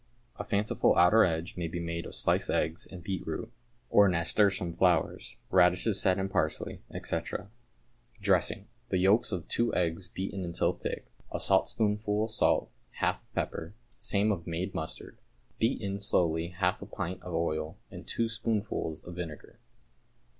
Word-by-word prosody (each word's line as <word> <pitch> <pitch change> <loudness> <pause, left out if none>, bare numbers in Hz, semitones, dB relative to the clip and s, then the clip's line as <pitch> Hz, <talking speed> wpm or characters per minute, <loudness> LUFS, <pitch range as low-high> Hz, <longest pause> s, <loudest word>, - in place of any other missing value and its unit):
A - - -3
fanciful 105 0 +2
outer 105 +6 +7
edge 80 -1 -1
may 85 -2 -2
be 85 +2 -4
made 85 0 -3
of - - -8
sliced - - +2
eggs 80 +3 0
and 90 -2 -10
beetroot, 95 +4 -4 0.4
or 100 0 +7
nasturtium 90 +1 +2
flowers, 90 -2 +1
radishes 90 +3 +4
set 95 0 +3
in 95 0 0
parsley, 85 -5 -1 0.2
&c. - - 0 1.0
Dressing. 100 0 +2 0.2
The 95 - +1
yolks 100 +7 +4
of 90 -5 -3
two 120 0 +1
eggs 85 +1 0
beaten 95 0 -4
until 85 -1 +1
thick, - - -5 0.3
a - - -2
saltspoonful 105 0 +2
of 110 - -3
salt, - - +2 0.2
half - - 0
of - - -34
pepper, 85 +5 -3 0.2
same 105 +1 +2
of 90 -4 -3
made 85 +3 -3
mustard. 80 - -6 0.4
Beat 115 +4 +2
in 100 -2 -3
slowly 85 -5 +1
half 90 +1 0
a - - -7
pint 95 -2 -4
of 90 -2 -5
oil 80 -1 -1
and - - -9
two 115 - 0
spoonsful 110 -7 -2
of 85 - -8
vinegar. 85 -4 -7
90 Hz, 155 wpm, -30 LUFS, 85-100 Hz, 1.0 s, outer